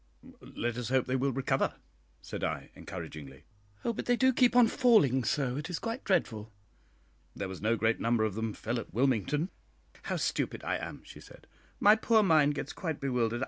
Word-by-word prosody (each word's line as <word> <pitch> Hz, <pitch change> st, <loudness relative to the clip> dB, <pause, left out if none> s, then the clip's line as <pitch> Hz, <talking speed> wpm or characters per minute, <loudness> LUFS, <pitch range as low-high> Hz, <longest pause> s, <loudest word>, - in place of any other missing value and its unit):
"Let 120 Hz, 0 st, -4 dB
us 125 Hz, -1 st, -3 dB
hope 130 Hz, -1 st, +2 dB
they 130 Hz, -, -1 dB
will 135 Hz, +1 st, +1 dB
recover," 135 Hz, +1 st, 0 dB, 0.5 s
said -, -, -6 dB
I, -, -, -3 dB
encouragingly. 70 Hz, -2 st, -9 dB, 0.4 s
"Oh, 235 Hz, -, +1 dB
but -, -, -5 dB
they 245 Hz, -, +4 dB
do 260 Hz, +1 st, +3 dB
keep 245 Hz, 0 st, +3 dB
on 245 Hz, -2 st, +7 dB
falling 215 Hz, -, +4 dB
so, 130 Hz, -1 st, 0 dB
it 150 Hz, +3 st, -5 dB
is 175 Hz, -, -2 dB
quite 230 Hz, +3 st, -4 dB
dreadful." 110 Hz, -, 0 dB, 0.8 s
"There 100 Hz, -, -4 dB
was 95 Hz, -1 st, -8 dB
no 110 Hz, +2 st, +2 dB
great 110 Hz, 0 st, +1 dB
number 115 Hz, -1 st, +1 dB
of 110 Hz, -2 st, 0 dB
them 110 Hz, +1 st, -3 dB
fell 115 Hz, +4 st, -3 dB
at 115 Hz, -, -9 dB
Wilmington." 135 Hz, -, +1 dB, 0.6 s
"How -, -, -1 dB
stupid -, -, -2 dB
I -, -, -1 dB
am!" -, -, -7 dB
she -, -, -12 dB
said; -, -, -15 dB, 0.3 s
"my 210 Hz, +1 st, +7 dB
poor 220 Hz, 0 st, +3 dB
mind 155 Hz, -5 st, +4 dB
gets 145 Hz, -, -5 dB
quite 160 Hz, -5 st, -4 dB
bewildered. 120 Hz, -4 st, 0 dB
130 Hz, 190 wpm, -30 LUFS, 115-190 Hz, 0.8 s, on